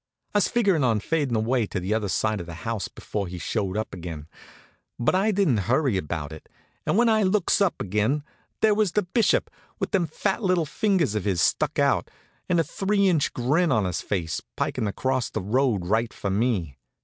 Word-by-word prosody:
I - - +3
was - - +2
figurin' 200 - +2
on 115 -4 +2
fadin' 145 0 0
away 115 +1 +1
to - - -3
the 95 +4 -1
other 110 -2 0
side 110 +2 0
of 85 - -7
the 85 - -7
house 115 -3 -2
before 100 -3 -5
he 90 +1 -6
showed 95 +3 -2
up 110 - -3
again; 80 -4 -7 0.7
but 120 - +1
I 195 +4 +2
didn't 145 - +1
hurry 130 -3 +2
about 80 -4 -3
it, 80 - -11 0.4
and - - +2
when 240 +1 +4
I 220 -1 +4
looks 195 0 +2
up 195 -3 +2
again 105 +9 0 0.4
there 215 -1 +5
was 205 -4 +1
the 210 - +2
Bishop, 195 +6 +1 0.3
with - - -3
them 185 -5 +2
fat 195 +8 -1
little 185 -5 +2
fingers 185 - +1
of 105 -3 -2
his 95 -4 +1
stuck - - +1
out, - - +2 0.4
and 175 -2 +3
a - - +4
three 195 +5 +1
inch 160 -6 +1
grin 150 +7 +1
on 110 -5 +2
his 90 -3 -2
face, 85 -5 -2 0.2
pikin' 110 - -1
across 130 +5 -1
the - - -3
road 110 -1 +1
right 110 +4 +1
for 100 - -4
me. 95 - -1
120 Hz, 205 wpm, -25 LUFS, -, 0.7 s, there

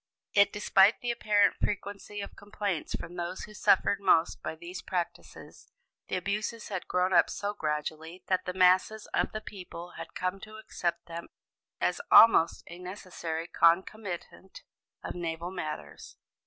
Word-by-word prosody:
Yet, 200 0 +5
despite 205 0 +4
the 245 - -1
apparent 210 -3 +3
frequency 205 0 -3
of 200 - -8
complaints 205 -5 -3
from 170 +1 -8
those 175 +2 -4
who 210 - -10
suffered 200 0 +3
most 165 -4 +3
by 155 - -4
these 175 +3 -8
practices, 175 -2 -6 0.4
the - - -2
abuses 210 +4 -3
had 190 -3 -4
grown 180 +1 +1
up - - +5
so 205 0 -3
gradually 160 0 -4
that 185 -1 0
the 180 - -3
masses 185 +4 +4
of - - +1
the 215 - -5
people 180 -4 -9
had 165 - -9
come 185 +1 -2
to 215 +2 -11
accept 175 -5 -3
them 170 0 -7 0.5
as - - 0
almost 220 -7 +7
a 170 +1 -10
necessary 180 -3 -5
concomitant 185 +2 0 0.4
of - - -4
naval 170 0 -4
matters. 155 -5 -7
185 Hz, 150 wpm, -29 LUFS, 170-205 Hz, 0.5 s, almost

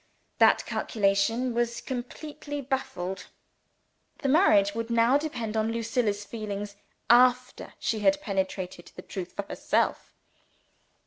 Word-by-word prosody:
That - - +5
calculation 225 +4 0
was 235 0 -1
completely 290 +3 -6
baffled. 255 -9 -3 1.0
The 275 - +1
marriage 210 - +5
would 230 +1 -4
now 235 +2 +4
depend 240 -8 -4
on 220 0 +1
the 230 0 -2
state 230 +3 -2
of 245 - +3
Lucilla's 205 0 -1
feelings, 205 -2 -5 0.3
after 250 +1 +3
she 220 - -1
had 290 +7 +3
penetrated 190 -6 -3
the 180 - -9
truth 185 -2 -6
for 200 - -3
herself. - - -1
230 Hz, 130 wpm, -27 LUFS, 200-255 Hz, 1.0 s, That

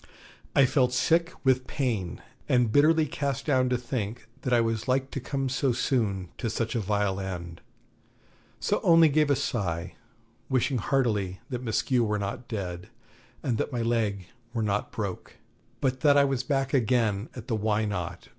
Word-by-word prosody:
I 140 - +7
felt 125 -1 +2
sick 165 +7 +2
with 130 -1 +2
pain 110 - -2 0.3
and 125 -3 +3
bitterly 155 +4 +5
cast 140 -2 -3
down 130 -4 +2
to 125 - +2
think 120 -2 -4
that 125 - -3
I 120 - +5
was 115 -1 -1
like 130 +1 +1
to - - -3
come 135 +1 -2
so 130 0 +1
soon 105 -7 0
to 115 - -1
such 110 +1 -2
a 120 - 0
vile 100 -1 0
end; 85 -3 -6 1.0
so - - 0
only 165 -1 +6
gave 150 0 +2
a 140 - +4
sigh, 90 -10 -2 0.6
wishing 130 -1 +1
heartily 105 -7 0
that 125 -1 -3
Maskew 120 +1 +1
were 105 -1 0
not 115 +5 -4
dead, 90 -5 -5 0.5
and 120 -4 0
that - - -1
my 120 -2 -1
leg 110 -5 0 0.3
were 115 - 0
not 105 -1 -1
broke, 105 -6 -5 0.5
but 130 -2 0
that 145 +1 +5
I 140 - +6
was 135 -3 0
back 135 0 -1
again 115 -4 +1
at 125 -1 -8
the 115 - 0
Why 110 0 +1
Not? 90 -4 -4
120 Hz, 175 wpm, -27 LUFS, 105-135 Hz, 1.0 s, I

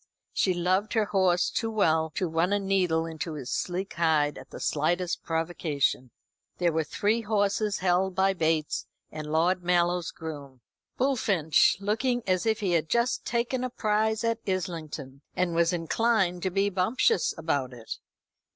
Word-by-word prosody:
She 185 -2 +1
loved 185 +4 0
her 220 -2 +2
horse 185 -3 +2
too 225 - -1
well 160 -7 +2
to 185 - 0
run 165 +3 0
a - - +3
needle 185 -5 +1
into 160 0 -5
his 135 -4 -6
sleek 185 +2 -2
hide 155 -3 +2
at - - -13
the - - -9
slightest 175 +4 0
provocation. 160 -6 -1 0.5
There 175 -1 +2
were 160 0 0
three 210 +8 0
horses, 205 -1 0
held 185 +1 +1
by 195 0 +3
Bates 160 -3 0 0.2
and 155 -1 -6
Lord 175 +4 +2
Mallow's 175 -1 +1
groom. 145 -5 -8 0.4
Bullfinch, 205 - +3
looking 230 +4 0
as 185 +2 +1
if 220 0 +1
he 195 -3 0
had 160 -2 +1
just 235 +1 +1
taken 240 +2 -1
a 255 - -1
prize 220 -1 0
at 230 0 0
Islington 165 -7 -4
and 180 -2 0
was 170 0 +3
inclined 180 +1 +1
to 190 - 0
be 195 +2 +1
bumptious 185 +1 +1
about 145 -5 -1
it. 120 -2 -7
180 Hz, 160 wpm, -27 LUFS, 160-205 Hz, 0.5 s, a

